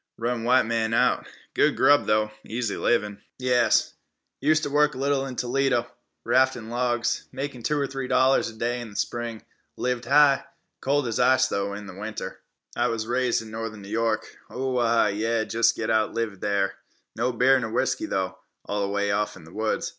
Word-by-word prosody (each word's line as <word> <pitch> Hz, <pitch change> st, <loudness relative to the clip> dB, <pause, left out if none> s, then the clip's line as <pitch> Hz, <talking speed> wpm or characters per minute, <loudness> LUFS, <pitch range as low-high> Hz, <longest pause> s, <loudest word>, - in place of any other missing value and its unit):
Run 115 Hz, 0 st, -2 dB
white 125 Hz, 0 st, +4 dB
man 115 Hz, 0 st, 0 dB
out. -, -, +2 dB, 0.3 s
Good -, -, +2 dB
grub, 145 Hz, 0 st, +4 dB
though. 105 Hz, 0 st, +2 dB
Easy 115 Hz, -2 st, -3 dB
livin'." 105 Hz, -3 st, 0 dB, 0.2 s
"Yas; 125 Hz, -2 st, +2 dB, 0.5 s
useter 155 Hz, -1 st, +2 dB
work 150 Hz, 0 st, +3 dB
little 135 Hz, +1 st, 0 dB
in 130 Hz, -, -6 dB
Toledo, 125 Hz, -1 st, +1 dB, 0.4 s
raftin' 130 Hz, -3 st, +2 dB
logs. 120 Hz, -1 st, -1 dB
Make 135 Hz, -3 st, -5 dB
two 150 Hz, -, 0 dB
or 140 Hz, -, +1 dB
three 135 Hz, -1 st, -5 dB
dollars 130 Hz, -1 st, +3 dB
er 110 Hz, -, -16 dB
day 120 Hz, +2 st, -1 dB
in 120 Hz, -, -7 dB
the 100 Hz, -, -14 dB
spring. 120 Hz, -1 st, -3 dB, 0.3 s
Lived 125 Hz, -1 st, -2 dB
high. 140 Hz, +1 st, +5 dB, 0.4 s
Cold 140 Hz, 0 st, +1 dB
as 115 Hz, -, -2 dB
ice, 130 Hz, 0 st, +4 dB
though, 100 Hz, 0 st, -2 dB
in 105 Hz, 0 st, -8 dB
the 95 Hz, -, -9 dB
winter." 110 Hz, +3 st, -6 dB, 0.4 s
"I 120 Hz, -, +2 dB
was 115 Hz, -2 st, -2 dB
raised 120 Hz, 0 st, 0 dB
in 110 Hz, -, -11 dB
northern 110 Hz, -2 st, -6 dB
N'York. 110 Hz, +2 st, 0 dB, 0.3 s
O 130 Hz, -1 st, -2 dB
a -, -, +2 dB
ah, 115 Hz, 0 st, +3 dB
yeh 110 Hz, +3 st, 0 dB
jest 115 Hz, +1 st, +2 dB
oughto 110 Hz, -1 st, +1 dB
live 110 Hz, -4 st, -3 dB
there. 100 Hz, -1 st, -1 dB, 0.4 s
No 120 Hz, +3 st, 0 dB
beer 130 Hz, +3 st, +4 dB
ner 115 Hz, -3 st, -3 dB
whisky, 130 Hz, +7 st, -1 dB
though, 95 Hz, -6 st, -2 dB, 0.3 s
way 100 Hz, 0 st, -1 dB
off 105 Hz, +1 st, -1 dB
in 95 Hz, -, -13 dB
the 80 Hz, +2 st, -15 dB
woods. 110 Hz, 0 st, -1 dB
115 Hz, 180 wpm, -25 LUFS, 110-130 Hz, 0.5 s, high